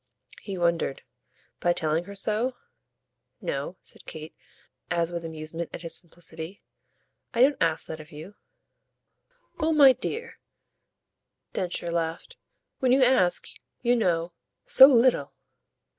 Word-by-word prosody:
He 195 -3 -6
wondered. 170 -5 0 0.6
"By 175 - +2
telling 160 0 -1
her 200 +1 -9
so?" 220 +5 0 0.8
"No," - - -4
said - - -9
Kate 155 +1 -8 0.6
as 170 -1 0
with 170 -1 -4
amusement 160 +1 -6
at - - -7
his 165 - -4
simplicity; 170 +1 -6 0.7
"I 235 - +2
don't 280 +2 +3
ask 165 -1 +1
that 160 - -7
of 155 +1 -12
you." 160 +6 -10 1.3
"Oh 320 0 +1
my 280 -4 +8
dear," 460 - -5 1.1
Densher 175 -1 -3
laughed, 165 -1 -3 0.4
"when 255 -2 +2
you 260 +1 +5
ask, 215 -9 +3 0.4
you 240 0 +3
know, 175 -6 0 0.3
so 265 - +9
little 235 - +3
175 Hz, 125 wpm, -26 LUFS, 165-245 Hz, 1.3 s, so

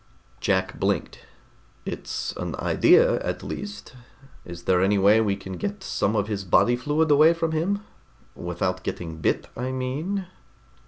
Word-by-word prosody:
Jack 95 -1 0
blinked. - - -1 0.7
"It's - - -4
an - - -4
idea, - - +4
at - - -3
least. 105 +9 -7 0.5
Is 85 0 -9
there 90 0 +3
any 100 +2 +3
way 100 +3 +5
we 100 -3 +1
can 95 -1 -8
get 205 -1 -4
some 105 - 0
of 105 -1 +1
his 100 -2 -3
body 120 +6 +4
fluid 150 +5 +1
away 155 +3 +6
from 165 -1 -1
him? 190 +6 -1 0.5
Without 90 +2 -3
getting 80 -3 -5
bit, 80 - 0
I 125 +2 -3
mean?" 145 +10 -3
105 Hz, 150 wpm, -25 LUFS, 95-155 Hz, 0.7 s, away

